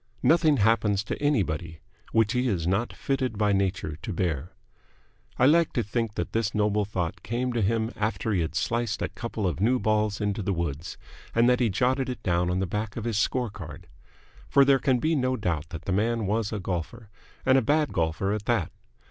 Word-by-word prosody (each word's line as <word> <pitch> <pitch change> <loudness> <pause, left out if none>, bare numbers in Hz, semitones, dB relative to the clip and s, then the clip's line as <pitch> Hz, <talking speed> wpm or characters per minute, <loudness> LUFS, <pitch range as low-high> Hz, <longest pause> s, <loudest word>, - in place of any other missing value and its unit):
Nothing 160 -3 +4
happens 105 -2 +2
to 105 - -5
anybody 85 - 0 0.3
which 110 -1 +3
he 125 +1 +1
is 90 -8 -1
not 95 +7 0
fitted 130 -5 -2
by 105 -1 +2
nature 95 -6 -1
to - - -6
bear." 85 0 -2 0.8
I 125 - +4
like 165 +3 +4
to 120 - 0
think 110 +1 -2
that - - -3
this 115 -1 -1
noble 105 0 +2
thought 90 -5 -3
came 125 +2 -2
to 120 - 0
him 110 +3 +1
after 110 +1 -1
he 90 - +1
had 80 0 -3
sliced 115 +5 -1
a - - -1
couple 115 -3 -4
of 85 -3 -1
new 120 +6 +3
balls 110 -3 +1
into 105 0 -1
the 100 0 -1
woods, 85 0 -4 0.4
and 115 +1 +5
that 125 0 +4
he 120 -3 +2
jotted 130 +6 +1
it 125 - -6
down 90 -1 +1
on 90 - 0
the 95 - 0
back 105 +3 -3
of 115 - -3
his 115 -3 0
score 125 -1 0
card. 90 -2 -9 0.6
For 140 -1 +6
there 135 -1 +5
can 130 -2 +2
be 160 +6 +1
no 130 -2 +1
doubt 85 -6 -2
that 85 -2 -8
the - - -2
man 110 +2 +1
was 105 +1 0
a 105 - -3
golfer, 95 +5 -5 0.3
and 130 - +5
a 135 - +5
bad 150 +5 +1
golfer 85 +4 0
at 105 -1 -4
that. 115 -8 0
105 Hz, 210 wpm, -26 LUFS, 95-120 Hz, 0.8 s, For